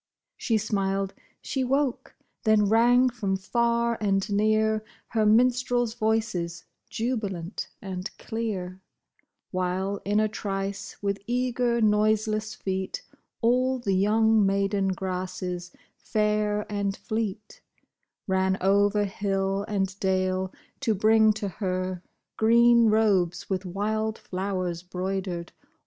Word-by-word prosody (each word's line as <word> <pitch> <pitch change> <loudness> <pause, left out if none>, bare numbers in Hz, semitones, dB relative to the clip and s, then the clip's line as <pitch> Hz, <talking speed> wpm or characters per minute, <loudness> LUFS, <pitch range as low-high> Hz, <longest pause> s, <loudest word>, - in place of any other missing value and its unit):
She 225 - 0
smiled, 195 -2 -1 0.3
she 265 - -1
woke! 270 0 -1 0.3
Then 215 -2 +4
rang 240 +4 +5
from 210 -6 -2
far 235 +3 0
and 195 -1 +1
near 215 +1 +2 0.3
Her 220 -2 +2
minstrels' 245 +1 +3
voices, 215 -7 -1 0.2
jubilant 215 -7 -3
and 185 0 -4
clear; 190 -5 -4 0.7
While 185 +2 -1
in 205 +2 +1
a 215 - +3
trice, 195 -2 -4
with 200 0 0
eager, 245 -1 0
noiseless 215 0 +2
feet, 190 - -3 0.4
All 255 +2 +2
the 210 -6 -1
young 215 +3 +4
maiden 195 0 +1
grasses, 185 -1 -3 0.3
fair 210 -1 0
and 200 -1 -2
fleet, 215 -2 -4 0.6
Ran 190 0 +1
over 200 +2 +3
hill 195 0 -1
and 195 -1 -2
dale, 185 0 0 0.3
to 220 - +1
bring 220 +2 +5
to 210 -1 -4
her 185 -2 -3 0.4
Green 235 +1 +5
robes 200 -5 +2
with 190 0 -1
wild 215 +4 -1
flowers 185 -2 -3
'broidered. 180 -1 -4
205 Hz, 110 wpm, -26 LUFS, 190-220 Hz, 0.7 s, rang